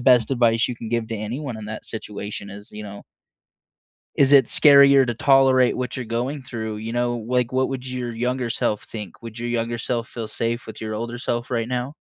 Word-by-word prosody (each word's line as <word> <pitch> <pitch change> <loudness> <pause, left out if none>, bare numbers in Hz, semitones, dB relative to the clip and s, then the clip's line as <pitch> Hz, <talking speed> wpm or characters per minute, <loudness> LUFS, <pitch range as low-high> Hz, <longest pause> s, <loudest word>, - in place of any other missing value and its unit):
best 125 -1 +4
advice 120 -2 +3
you 125 - -4
can 115 - -7
give 115 -1 -1
to 115 - -3
anyone 120 +4 -4
in 110 - -8
that 110 0 -7
situation 105 -2 -6
is, 100 +1 -10
you 105 - -7
know 100 0 -9 1.1
"is 140 0 +4
it 135 -4 +7
scarier 140 -1 +7
to 120 - -2
tolerate 130 0 +4
what 125 -1 -3
you're 130 - -4
going 125 +5 -3
through, 110 -4 -5
you 110 +2 -5
know, 120 0 0
like, 125 -1 +1
what 130 0 +1
would 130 -1 -5
your 125 -2 -4
younger 125 +1 -2
self 105 -2 -1
think, 105 -5 -9
would 115 -1 -8
your 120 0 -3
younger 120 0 -1
self 115 0 -2
feel 115 -2 -5
safe 115 +2 -2
with 110 - -9
your 110 -1 -4
older 120 +2 -4
self 120 -1 -3
right 115 -2 -1
now?" 125 +3 -3
120 Hz, 215 wpm, -23 LUFS, 110-130 Hz, 1.1 s, it